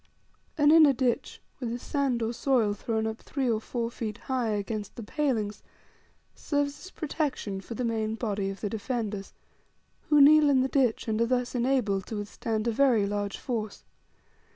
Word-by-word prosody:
An 295 Hz, -1 st, +5 dB
inner 310 Hz, -3 st, +7 dB
ditch, 250 Hz, -2 st, -1 dB, 0.2 s
with 245 Hz, -3 st, -3 dB
the 235 Hz, -, -3 dB
sand 260 Hz, -2 st, -1 dB
or 225 Hz, +1 st, -1 dB
soil 240 Hz, -5 st, +2 dB
thrown 220 Hz, +1 st, -2 dB
up 220 Hz, 0 st, -3 dB
three 275 Hz, -3 st, -3 dB
or 220 Hz, -2 st, +1 dB
four 235 Hz, 0 st, -3 dB
feet 215 Hz, -3 st, -5 dB
high 255 Hz, -3 st, -2 dB
against 210 Hz, 0 st, -3 dB
the 235 Hz, -, -7 dB
palings, 220 Hz, -5 st, -1 dB, 0.7 s
serves 285 Hz, -1 st, -2 dB
as -, -, -9 dB
protection 285 Hz, -, -3 dB
for 230 Hz, +5 st, -8 dB
the 250 Hz, -, -2 dB
main 220 Hz, -1 st, -1 dB
body 205 Hz, -4 st, -2 dB
of 195 Hz, -, -7 dB
the 205 Hz, -, -1 dB
defenders, 215 Hz, -2 st, -3 dB, 0.8 s
who 295 Hz, -1 st, +5 dB
kneel 300 Hz, +1 st, +7 dB
in 265 Hz, -2 st, +4 dB
the 260 Hz, -, +1 dB
ditch, 260 Hz, -5 st, +1 dB
and 220 Hz, 0 st, 0 dB
are 230 Hz, -, +3 dB
thus 250 Hz, 0 st, 0 dB
enabled 240 Hz, -6 st, +1 dB
to 220 Hz, -, -5 dB
withstand 215 Hz, +2 st, -3 dB
a -, -, +2 dB
very 235 Hz, -4 st, +3 dB
large 205 Hz, 0 st, -2 dB
force. 220 Hz, -5 st, -4 dB
235 Hz, 175 wpm, -28 LUFS, 215-265 Hz, 0.8 s, inner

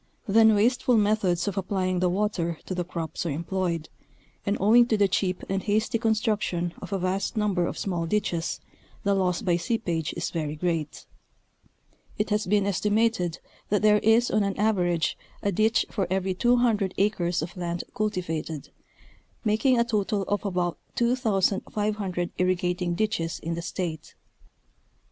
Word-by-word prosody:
Then 220 Hz, +1 st, +6 dB
wasteful 240 Hz, +3 st, +3 dB
methods 205 Hz, -4 st, +2 dB
of 200 Hz, -1 st, -1 dB
applying 185 Hz, -1 st, -1 dB
the 180 Hz, 0 st, +2 dB
water 180 Hz, -4 st, -1 dB
to -, -, -4 dB
the 180 Hz, -1 st, -1 dB
crops 165 Hz, -3 st, -4 dB
are -, -, -1 dB
employed, 170 Hz, +1 st, -2 dB, 0.6 s
and 200 Hz, -, +1 dB
owing 235 Hz, +5 st, +6 dB
to 220 Hz, -, +2 dB
the 200 Hz, -1 st, +4 dB
cheap 185 Hz, -1 st, -1 dB
and 195 Hz, 0 st, -1 dB
hasty 220 Hz, +3 st, 0 dB
construction 215 Hz, -6 st, 0 dB
of -, -, -8 dB
a 195 Hz, -, +1 dB
vast 190 Hz, +4 st, -1 dB
number 195 Hz, -5 st, +1 dB
of -, -, -5 dB
small 175 Hz, -4 st, -2 dB
ditches 170 Hz, -3 st, -1 dB, 0.4 s
the 200 Hz, -, +2 dB
loss 185 Hz, -2 st, 0 dB
by 175 Hz, -2 st, +2 dB
seepage 170 Hz, -4 st, -1 dB
is 170 Hz, -, -2 dB
very 155 Hz, -3 st, -3 dB
great; 165 Hz, -2 st, -2 dB, 1.1 s
it 210 Hz, +1 st, -1 dB
has 210 Hz, -1 st, +1 dB
been 205 Hz, +1 st, +3 dB
estimated 205 Hz, -2 st, +1 dB, 0.3 s
that 205 Hz, +1 st, +1 dB
there 210 Hz, 0 st, +6 dB
is 225 Hz, +3 st, +3 dB
on 215 Hz, -, +3 dB
an 200 Hz, -1 st, -1 dB
average 175 Hz, -7 st, +1 dB, 0.2 s
a 200 Hz, -, +1 dB
ditch 220 Hz, +6 st, +2 dB
for 195 Hz, -5 st, -1 dB
every 190 Hz, 0 st, 0 dB
200 230 Hz, -2 st, +2 dB
acres 180 Hz, -5 st, +1 dB
of 170 Hz, -, -7 dB
land 175 Hz, -1 st, -3 dB
cultivated, 165 Hz, -8 st, -3 dB, 0.7 s
making 225 Hz, +5 st, +3 dB
a -, -, +5 dB
total 210 Hz, -3 st, 0 dB
of 205 Hz, +1 st, -1 dB
about 180 Hz, -3 st, -1 dB, 0.2 s
2500 210 Hz, -5 st, 0 dB
irri 185 Hz, 0 st, +3 dB
gating 180 Hz, 0 st, -1 dB
ditches 170 Hz, -5 st, -1 dB
in 165 Hz, -, -3 dB
the 170 Hz, -, -3 dB
State. 170 Hz, -2 st, -5 dB
195 Hz, 155 wpm, -26 LUFS, 175-215 Hz, 1.1 s, Then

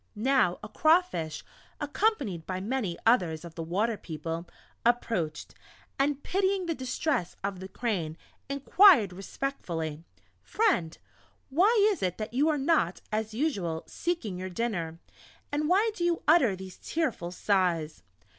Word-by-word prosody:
Now, 240 Hz, -5 st, +2 dB
a -, -, -5 dB
Crawfish, 310 Hz, -, +2 dB, 0.4 s
accompanied 290 Hz, -, 0 dB
by 185 Hz, -1 st, -2 dB
many 205 Hz, -4 st, -2 dB
others 175 Hz, -9 st, +2 dB
of 170 Hz, -, -9 dB
the 165 Hz, -, -6 dB
Water 205 Hz, +7 st, 0 dB
people, 165 Hz, +1 st, -5 dB, 0.3 s
approached, 225 Hz, -10 st, 0 dB, 0.5 s
and 285 Hz, 0 st, +1 dB
pitying 385 Hz, 0 st, +1 dB
the 335 Hz, -, 0 dB
distress 260 Hz, -, -2 dB
of 200 Hz, -2 st, -3 dB
the 190 Hz, -, -7 dB
Crane, 185 Hz, -9 st, -2 dB, 0.3 s
inquired 280 Hz, -, +6 dB
respectfully: 170 Hz, -, -4 dB, 0.4 s
"Friend, 360 Hz, -, +1 dB, 0.5 s
why 405 Hz, -, +5 dB
is 395 Hz, -, -4 dB
it 180 Hz, -1 st, -1 dB
that 215 Hz, +1 st, -5 dB
you 285 Hz, +5 st, +3 dB
are 305 Hz, -, +1 dB
not, 270 Hz, -, +1 dB
as 215 Hz, 0 st, -2 dB
usual, 195 Hz, -, -1 dB
seeking 245 Hz, -, -3 dB
your 185 Hz, 0 st, -4 dB
dinner, 175 Hz, -5 st, -2 dB, 0.5 s
and 300 Hz, +1 st, 0 dB
why 415 Hz, +5 st, +4 dB
do 360 Hz, -, -4 dB
you 345 Hz, -1 st, +1 dB
utter 280 Hz, -, +5 dB
these 185 Hz, -1 st, -10 dB
tearful 270 Hz, -, -2 dB
sighs?" 180 Hz, -5 st, 0 dB
220 Hz, 135 wpm, -29 LUFS, -, 0.5 s, inquired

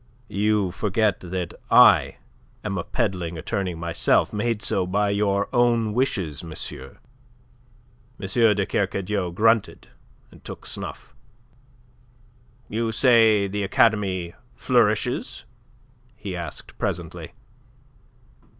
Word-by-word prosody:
"You 105 Hz, -2 st, +1 dB
forget 105 Hz, +1 st, 0 dB
that 90 Hz, -1 st, -5 dB, 0.2 s
I -, -, +6 dB, 0.5 s
am 100 Hz, -2 st, -3 dB
a -, -, -3 dB
peddling 90 Hz, -8 st, -2 dB
attorney 90 Hz, +2 st, -3 dB
myself, 85 Hz, 0 st, +1 dB
made 110 Hz, +1 st, -1 dB
so 95 Hz, -2 st, 0 dB
by 100 Hz, +2 st, +1 dB
your 100 Hz, 0 st, +1 dB
own 120 Hz, -3 st, +2 dB
wishes, 95 Hz, -, -1 dB
monsieur." 65 Hz, -5 st, -7 dB, 1.2 s
M. -, -, -6 dB, 0.3 s
de 100 Hz, -1 st, 0 dB
Kercadiou 100 Hz, -2 st, -2 dB
grunted, 110 Hz, +3 st, +1 dB, 0.4 s
and -, -, -18 dB
took -, -, -9 dB
snuff. -, -, -7 dB, 1.5 s
"You 115 Hz, +1 st, -2 dB
say 110 Hz, -4 st, +4 dB
the 105 Hz, +1 st, -3 dB
academy 95 Hz, -3 st, +1 dB, 0.2 s
flourishes?" 120 Hz, -1 st, 0 dB, 0.7 s
he 100 Hz, -4 st, -6 dB
asked 85 Hz, -5 st, -7 dB
presently. -, -, -4 dB
100 Hz, 100 wpm, -23 LUFS, 90-110 Hz, 1.5 s, I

